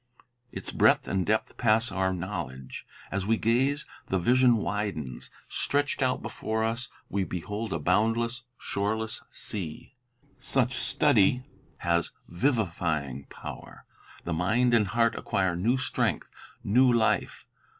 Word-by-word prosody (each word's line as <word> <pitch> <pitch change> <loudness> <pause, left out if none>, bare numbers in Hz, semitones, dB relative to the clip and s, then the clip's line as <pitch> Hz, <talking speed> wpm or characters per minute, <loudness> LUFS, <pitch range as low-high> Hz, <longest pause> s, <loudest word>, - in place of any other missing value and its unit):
Its - - -6
breadth - - +4
and 95 -2 0
depth 110 +1 0
pass 115 -1 +3
our 95 0 +1
knowledge. 85 -9 -5 0.2
As 100 0 -2
we 115 0 +3
gaze, 135 +7 +2 0.2
the 95 - +1
vision 125 +6 +4
widens; 100 - -3 0.2
stretched 145 0 0
out 130 -1 +1
before 110 0 -2
us 115 +3 -1 0.2
we 100 -1 -1
behold 105 +5 -4
a - - 0
boundless, 115 +8 +1 0.2
shoreless 110 +3 -2
sea. 90 - -6 0.5
Such 130 -1 0
study 120 +4 +3 0.3
has 85 -1 0
vivifying 85 - -1
power. - - -10 0.4
The 85 - -2
mind 110 +9 +2
and 110 -3 +4
heart 115 +3 +2
acquire 95 -3 0
new 115 +9 +2
strength, 130 - -1 0.3
new 125 +5 +5
life. 115 -2 +1
110 Hz, 125 wpm, -28 LUFS, 90-120 Hz, 0.5 s, new